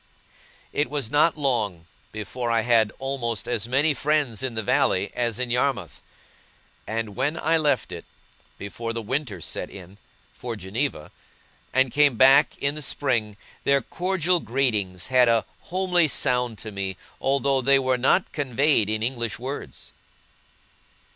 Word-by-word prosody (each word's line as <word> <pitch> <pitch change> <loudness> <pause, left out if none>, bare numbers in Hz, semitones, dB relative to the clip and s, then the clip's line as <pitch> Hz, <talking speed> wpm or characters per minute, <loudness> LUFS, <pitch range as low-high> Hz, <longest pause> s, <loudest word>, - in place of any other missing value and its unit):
It 145 - 0
was 140 -6 -3
not 155 +2 +3
long, 110 - -1 0.3
before 120 +3 -4
I 115 -1 +2
had 110 -2 +3
almost 125 -5 -3
as 115 -3 -2
many 140 +5 +2
friends 140 -5 0
in 130 -3 -3
the 110 - -2
valley - - +1
as 120 -3 -1
in 125 -1 -2
Yarmouth: 125 - -1 0.9
and 110 -2 -3
when 145 +6 -1
I 165 0 +2
left 145 -10 0
it, 85 -1 -7 0.5
before 115 +3 -5
the 115 - -3
winter 130 0 -3
set - - -4
in, 95 +1 -12 0.3
for 120 -2 -6
Geneva, 105 - -3 0.6
and 130 -1 +2
came 145 -2 +4
back 135 +4 +6
in 140 0 0
the 150 - -6
spring, 120 -7 -1 0.3
their 140 -2 +2
cordial 180 +1 0
greetings 110 - -1
had 125 -2 +4
a 115 -1 +2 0.2
homely 180 -2 +2
sound 125 -4 +1
to 110 - -7
me, 95 -2 -4 0.2
although 135 0 +1
they 135 +2 +4
were 130 -1 +1
not 155 +9 +2
conveyed 135 -5 +1
in 110 0 -1
English 120 -3 -2
words. 130 +4 -7
125 Hz, 145 wpm, -24 LUFS, 110-140 Hz, 0.9 s, back